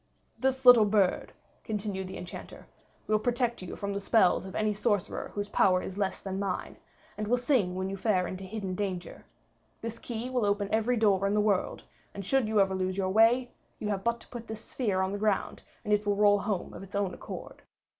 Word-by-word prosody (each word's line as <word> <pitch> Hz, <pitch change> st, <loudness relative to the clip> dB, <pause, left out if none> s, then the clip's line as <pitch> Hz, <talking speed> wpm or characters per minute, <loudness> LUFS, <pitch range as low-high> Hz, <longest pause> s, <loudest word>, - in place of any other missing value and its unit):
"This 265 Hz, +1 st, 0 dB
little 245 Hz, -3 st, +9 dB
bird," 200 Hz, -3 st, +2 dB, 0.3 s
continued 205 Hz, -3 st, -3 dB
the 190 Hz, -, -7 dB
Enchanter, 175 Hz, -, -9 dB, 0.4 s
"will 215 Hz, 0 st, +2 dB
protect 240 Hz, 0 st, 0 dB
you 185 Hz, -, -6 dB
from 200 Hz, 0 st, -3 dB
the 200 Hz, -, -3 dB
spells 195 Hz, -3 st, +3 dB
of 190 Hz, -, -9 dB
any 215 Hz, -1 st, +1 dB
sorcerer 205 Hz, -2 st, -1 dB
whose 205 Hz, 0 st, -2 dB
power 185 Hz, -2 st, +4 dB
is 185 Hz, -, -6 dB
less 195 Hz, -1 st, -2 dB
than 190 Hz, 0 st, -4 dB
mine, 195 Hz, -2 st, -3 dB, 0.4 s
and 210 Hz, -, -2 dB
will 245 Hz, +3 st, +3 dB
sing 245 Hz, -8 st, +1 dB
when 185 Hz, 0 st, -2 dB
you 195 Hz, -, -3 dB
fare 190 Hz, -2 st, +1 dB
into 185 Hz, +2 st, -6 dB
hidden 195 Hz, -1 st, -4 dB
danger; 185 Hz, -2 st, -4 dB, 0.6 s
this 230 Hz, 0 st, -5 dB
key 235 Hz, 0 st, -4 dB
will 250 Hz, -3 st, +1 dB
open 205 Hz, 0 st, 0 dB
every 225 Hz, +3 st, +2 dB
door 200 Hz, -3 st, +3 dB
in 200 Hz, -, +1 dB
the -, -, +3 dB
world; 205 Hz, -3 st, 0 dB, 0.3 s
and 200 Hz, -1 st, -6 dB
should 265 Hz, +2 st, +2 dB
you 215 Hz, -1 st, +2 dB
ever 195 Hz, -1 st, +3 dB
lose 185 Hz, 0 st, -1 dB
your 190 Hz, -1 st, 0 dB
way, 230 Hz, +5 st, +4 dB, 0.3 s
you 210 Hz, -, -4 dB
have 195 Hz, -2 st, -2 dB
but 235 Hz, +1 st, 0 dB
to -, -, -14 dB
put 235 Hz, -2 st, -8 dB
this 220 Hz, 0 st, -7 dB
sphere 205 Hz, -7 st, -1 dB
on 190 Hz, 0 st, 0 dB
the 205 Hz, -, -3 dB
ground, 210 Hz, -2 st, 0 dB, 0.2 s
and 210 Hz, -, +1 dB
it 210 Hz, 0 st, +2 dB
will 205 Hz, -1 st, +1 dB
roll 205 Hz, 0 st, +5 dB
home 200 Hz, -2 st, -3 dB
of -, -, -8 dB
its 195 Hz, +1 st, -10 dB
own 200 Hz, -2 st, 0 dB
accord. -, -, -8 dB
205 Hz, 215 wpm, -29 LUFS, 190-220 Hz, 0.6 s, little